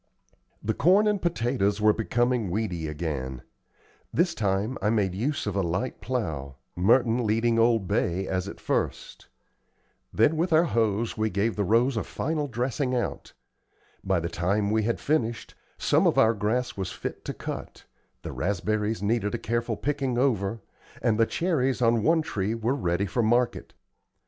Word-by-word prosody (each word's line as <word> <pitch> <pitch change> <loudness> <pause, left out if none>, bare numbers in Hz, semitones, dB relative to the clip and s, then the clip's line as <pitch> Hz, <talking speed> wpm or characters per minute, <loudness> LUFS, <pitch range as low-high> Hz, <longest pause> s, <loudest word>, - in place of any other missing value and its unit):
The 110 - 0
corn 190 - +4
and 205 -2 +1
potatoes 120 - 0
were 105 0 +5
becoming 120 -1 0
weedy 90 -5 -2
again. 70 -5 -4 0.7
This 170 +2 +2
time 105 +3 -1
I 105 - +2
made 105 -5 +1
use 135 +10 -2
of 105 -2 -2
a 100 - +2
light 90 +8 -2
plow, 80 - -3 0.2
Merton 115 +5 +3
leading 115 +2 +2
old 115 -4 +3
Bay 90 +3 0
as 95 0 -2
at - - -8
first. - - -3 0.8
Then, 115 +9 +3
with 170 +2 0
our 160 +1 +5
hoes, 115 - 0
we 110 0 +1
gave 105 +3 0
the 105 - 0
rows 115 +5 +2
a - - 0
final 155 -2 -2
dressing 125 +1 -1
out. 120 - -3 0.7
By 95 -2 +1
the 85 - -2
time 100 +5 0
we 110 0 +2
had 115 +2 -1
finished, 120 -6 -1 0.2
some - - +3
of - - +2
our 110 +1 +5
grass 115 +4 -1
was 95 -2 -4
fit - - -6
to - - -3
cut, - - -7 0.4
the - - -5
raspberries 105 +3 -1
needed 105 -1 0
a - - -1
careful 115 -1 -2
picking 135 -2 -1
over, 115 -5 0 0.4
and 115 -2 +1
the 115 - +4
cherries 135 -8 0
on 115 -2 +3
one 160 +6 +3
tree 105 -5 -2
were 115 +3 0
ready 95 -7 0
for 120 +5 -1
market. 120 +2 0
110 Hz, 165 wpm, -26 LUFS, 100-125 Hz, 0.8 s, were